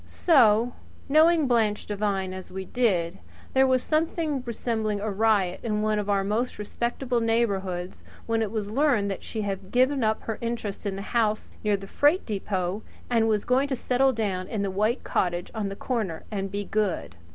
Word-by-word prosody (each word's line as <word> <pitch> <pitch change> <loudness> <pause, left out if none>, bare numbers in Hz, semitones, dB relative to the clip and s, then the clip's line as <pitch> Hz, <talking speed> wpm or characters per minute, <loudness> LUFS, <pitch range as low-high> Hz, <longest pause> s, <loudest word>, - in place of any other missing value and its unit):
So, 240 -7 +4 0.3
knowing 315 +2 +5
Blanche 225 -5 +1
Devine 200 -2 -1
as 185 0 -8
we 190 +1 -5
did, 190 -7 0 0.3
there 265 0 +5
was 255 -1 +2
something 310 -2 0
resembling 220 -3 -1
a 210 +1 -2
riot 200 -3 +2
in 215 -2 -1
one 215 0 +1
of 205 0 -3
our 200 -1 +2
most 220 +5 -1
respectable 240 +4 -2
neighbourhoods 195 -6 -1 0.2
when 225 0 0
it 220 - 0
was 210 -1 -3
learned 240 -6 +2
that 195 - -5
she 220 -2 -4
had 195 -1 -4
given 260 +1 +3
up 220 0 0
her 225 - -4
interest 230 -4 -3
in 195 - -2
the 195 - -5
house 215 -2 +1
near 210 -1 +2
the 195 - -9
freight 290 - +2
depot 195 -2 -2 0.3
and 225 -2 +3
was 215 -2 +1
going 260 +3 +2
to 275 - -1
settle 260 +2 +2
down 200 -6 -2
in 210 -3 -2
the 195 - -1
white 215 +6 0
cottage 175 -1 -1
on 215 -3 -2
the 195 - -6
corner 210 -9 -3
and 195 -2 -2
be 205 +1 -3
good. 200 - -1
215 Hz, 185 wpm, -26 LUFS, 195-240 Hz, 0.3 s, knowing